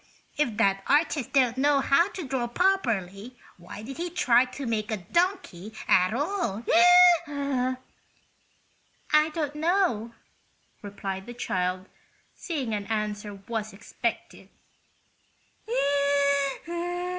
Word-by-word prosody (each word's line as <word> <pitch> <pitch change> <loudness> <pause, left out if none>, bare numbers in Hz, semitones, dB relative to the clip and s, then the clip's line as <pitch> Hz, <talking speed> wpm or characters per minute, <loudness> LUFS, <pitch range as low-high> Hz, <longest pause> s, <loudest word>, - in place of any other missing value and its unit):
If 240 -8 -1
that 195 -3 +2
artist 290 -3 +1
didn't 260 -2 +2
know 285 0 +3
how 335 +7 +3
to 360 -7 -6
draw 255 -2 -2
properly 240 - -1 0.2
why 180 +4 -10
did 265 +4 -8
he 350 +1 -3
try 255 -9 +3
to 255 +2 -8
make 220 -2 -2
a 215 - -1
donkey 220 - -2
at 185 +1 +4
all?" 275 - -2 0.6
"I 275 -3 -2 1.5
don't 300 -3 -3
know," 305 - 0 0.7
replied 195 -1 -6
the 240 - -8
child, 185 -4 -2 0.5
seeing 275 - -4
an 205 -1 -4
answer 210 -1 -3
was 220 -2 -4
expected. 195 - -5
240 Hz, 105 wpm, -26 LUFS, 210-295 Hz, 1.5 s, at